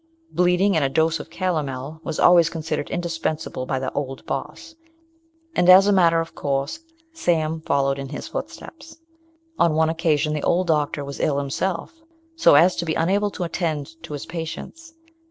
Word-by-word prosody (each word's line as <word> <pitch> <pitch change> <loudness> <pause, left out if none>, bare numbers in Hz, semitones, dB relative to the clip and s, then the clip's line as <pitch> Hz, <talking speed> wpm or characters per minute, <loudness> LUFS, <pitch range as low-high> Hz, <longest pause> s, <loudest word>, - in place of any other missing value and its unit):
Bleeding 180 +2 +2
and 155 - +2
a 135 - +1
dose 160 +3 +1
of - - -9
calomel 150 -4 -3
was 160 -2 -4
always 170 -2 +6
considered 155 -3 -4
indispensable 165 -6 -3
by 135 - -1
the 130 0 -3
"Old 135 -2 -4
Boss"; 155 - -5 0.8
and, 180 - +3
as 190 +2 +9
a 205 - +3
matter 170 -3 +4
of 165 0 -4
course, 140 - -2 0.3
Sam 160 - 0
followed 140 -1 +1
in 135 -1 -6
his 145 - -6
footsteps. 325 0 -8 0.6
On 165 -2 +3
one 160 0 +3
occasion 155 -2 +1
the 150 - -2
old 180 +5 +1
doctor 150 -3 0
was 140 0 -7
ill 145 -2 +1
himself, 170 - -3 0.3
so 325 - +5
as 175 +5 +5
to - - -1
be 160 - -1
unable 195 +5 +1
to 185 - -5
attend 165 -2 -3
to - - -8
his 145 - -5
patients. 175 - -7
160 Hz, 175 wpm, -22 LUFS, 145-175 Hz, 0.8 s, as